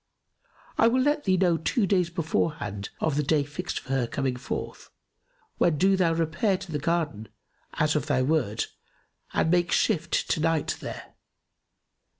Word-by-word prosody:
I 225 - +6
will 255 +2 +3
let 295 +1 +1
thee 185 -2 +3
know 175 -3 +3
two 200 +7 +1
days 180 -3 +2
beforehand 155 - -2
of 155 -3 0
the - - +3
day 150 0 +2
fixed 160 +4 -4
for - - -17
her 135 -3 +1
coming 135 0 -1
forth, 125 - -6 0.7
when 165 -3 +3
do 195 +4 +4
thou 175 -3 +2
repair 165 +5 +1
to 180 - -9
the 150 - -1
garden, 145 -9 -1 0.5
as 155 0 +1
of 150 - 0
thy 130 -4 +2
wont, 130 -7 0 0.6
and 160 - +1
make 175 -1 +2
shift 170 -6 +1
to - - +1
night 160 -1 +1
there. - - -8
160 Hz, 160 wpm, -27 LUFS, 145-180 Hz, 0.7 s, I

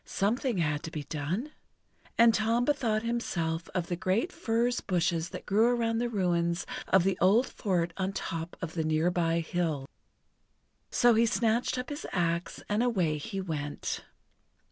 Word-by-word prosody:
Something 230 +3 0
had 150 -3 0
to - - -6
be 155 -2 -5
done. 165 - -3 0.7
And 230 0 +7
Tom 230 +3 +2
bethought 240 -7 +1
himself 170 -9 -2
of 180 -2 0
the 175 - -2
great 190 - 0
furze 240 -1 0
bushes 175 -2 0
that - - -8
grew 215 +4 +4
around 230 -1 0
the 240 0 0
ruins 175 -5 0 0.2
of 190 -2 +4
the 195 0 0
old 205 +8 +5
fort 175 -4 -1
on 190 0 -1
top 165 -3 -5
of 160 - -4
the 160 - -1
near 155 +2 +2
by 170 -1 +1
hill. 160 -5 -2 1.0
So 240 -1 +4
he 230 +1 +4
snatched 230 +3 +1
up 250 - -4
his 290 0 -5
axe 170 -1 -1
and 210 +2 +1
away 180 -11 +1
he 195 +6 -5
went. 150 -6 -3
185 Hz, 165 wpm, -29 LUFS, 165-230 Hz, 1.0 s, And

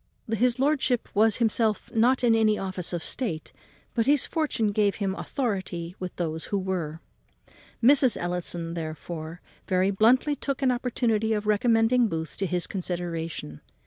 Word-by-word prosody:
His 245 +2 +2
lordship 270 -3 +1
was 215 +1 +4
not - - -5
himself 225 -2 +1 0.3
in 235 -2 +5
any 215 -1 +3
office 185 -2 -2
of 170 -3 -3
state, 205 -12 -3 0.4
but 230 0 0
his 285 -1 +3
fortune 290 -10 0
gave 205 -1 +2
him 200 -2 -1
great - - -6
authority 185 -9 -3
with 185 -1 -6
those 160 -2 -3
who 200 - -1
were. 175 -4 -3 0.8
Mrs. 260 0 +5
Ellison, 175 -1 -2
therefore, 160 +1 -6 0.3
very 185 +1 +2
bluntly 245 +8 +3
took 275 -1 -3
an 260 - +4
opportunity 230 -3 0
of 210 -1 -2
recommending 225 +3 +3
Booth 160 -4 -4
to 195 - -1
his 180 -1 -1
consideration. 170 - -5
205 Hz, 150 wpm, -26 LUFS, 175-235 Hz, 0.8 s, in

